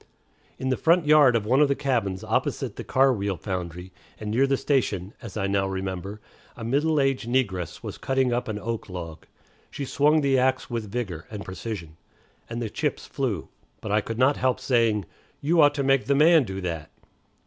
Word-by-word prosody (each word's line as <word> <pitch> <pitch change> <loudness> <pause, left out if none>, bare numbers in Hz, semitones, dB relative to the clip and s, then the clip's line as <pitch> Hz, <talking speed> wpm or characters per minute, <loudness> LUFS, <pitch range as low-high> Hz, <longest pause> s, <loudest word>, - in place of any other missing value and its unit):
In 130 - -2
the 130 - +1
front 170 0 +3
yard 150 -5 +6
of 110 -3 0
one 130 +6 +3
of 150 - +6
the 140 - +1
cabins 110 -9 -1
opposite 110 - -1
the - - -6
car 135 0 +3
wheel 100 -4 -2
foundry, 90 +1 -5 0.3
and 105 -1 -4
near 130 +5 +3
the 135 0 +2
station, 105 -10 0
as 115 -4 -8
I 100 - 0
now 100 0 +1
remember, 95 +1 -4 0.4
a 115 - -7
middle 145 +6 +1
aged 135 -4 0
negress 100 -10 -1
was - - -7
cutting 130 -2 +1
up 120 - -1
an 110 -2 -3
oak 115 0 -4
log. 85 -3 -7 0.4
She 140 - -5
swung 150 +4 +3
the 135 -2 +3
axe 130 0 0
with 110 -4 -4
vigor 95 -9 -4
and 105 -2 -7
precision, 95 -5 -6 0.5
and 115 0 -4
the - - -2
chips - - -2
flew; - - -3 0.3
but 105 - -5
I 105 +1 +3
could 115 +2 -5
not 130 +3 +3
help 130 -1 +1
saying, 115 -6 +2 0.3
"You 160 +3 +3
ought 145 0 +5
to 140 - 0
make 135 -1 +3
the 140 - +2
man 155 0 +6
do 95 -2 -5
that." 80 -4 -4
115 Hz, 200 wpm, -25 LUFS, 95-135 Hz, 0.5 s, yard